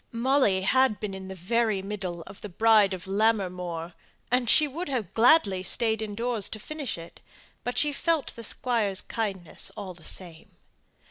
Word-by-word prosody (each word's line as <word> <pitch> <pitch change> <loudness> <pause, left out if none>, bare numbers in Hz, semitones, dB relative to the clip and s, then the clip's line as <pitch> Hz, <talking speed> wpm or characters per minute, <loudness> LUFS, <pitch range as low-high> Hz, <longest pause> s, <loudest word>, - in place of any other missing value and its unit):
Molly 235 -5 +2
had 260 0 +3
been 210 -2 -4
in 190 0 -7
the 190 - -7
very 210 +2 0
middle 190 -4 -5
of - - -12
the 210 - -7
Bride 210 0 +4
of 175 - -10
Lammermoor, 180 -5 0 0.4
and 245 -2 +3
would 275 - -3
gladly 230 -4 +5
have 185 0 -4
stayed 220 -2 +1
in 210 -2 -4
doors 230 -2 -1
to - - -5
finish 285 - -5
it, 165 0 -12 0.4
but 245 - -3
she 295 -1 +3
felt 325 0 0
the 230 - -8
squire's 220 -4 0
kindness 195 -7 -4
all 195 -3 -6
the 170 -2 -18
same. 170 -3 -7
210 Hz, 170 wpm, -27 LUFS, 190-240 Hz, 0.4 s, gladly